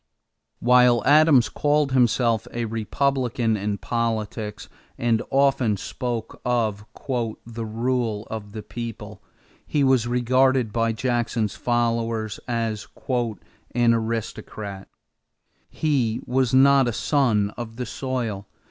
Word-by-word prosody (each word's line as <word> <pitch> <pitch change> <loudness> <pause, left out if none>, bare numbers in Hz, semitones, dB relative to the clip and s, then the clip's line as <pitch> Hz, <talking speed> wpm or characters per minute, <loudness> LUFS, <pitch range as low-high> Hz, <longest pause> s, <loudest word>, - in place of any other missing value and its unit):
While 125 -2 +4
Adams 145 -4 +6
called 145 -1 +1
himself 120 -2 +2
a 120 0 -2
Republican 120 +1 0
in 100 0 -2
politics 110 0 -3 0.3
and 115 -2 +1
often 135 -6 +2
spoke 120 +3 -5
of 110 -4 0 0.6
"the 115 0 -6
rule 115 -1 -1
of 105 -2 -7
the 110 -1 -6
people," 105 -4 -7 0.4
he 145 - 0
was 130 -3 +3
regarded 125 -1 +2
by 115 -1 +1
Jackson's 115 -3 -1
followers 115 -2 -1
as 115 -3 -2 0.2
"an 120 0 -1
aristocrat." 110 -3 -4 0.8
He 125 -7 0
was 130 -1 +1
not 135 0 +5
a 120 - -1
son 110 -7 +1
of 115 -2 -7
the 125 +1 -4
soil. 115 -5 -4
115 Hz, 110 wpm, -24 LUFS, 110-125 Hz, 0.8 s, Adams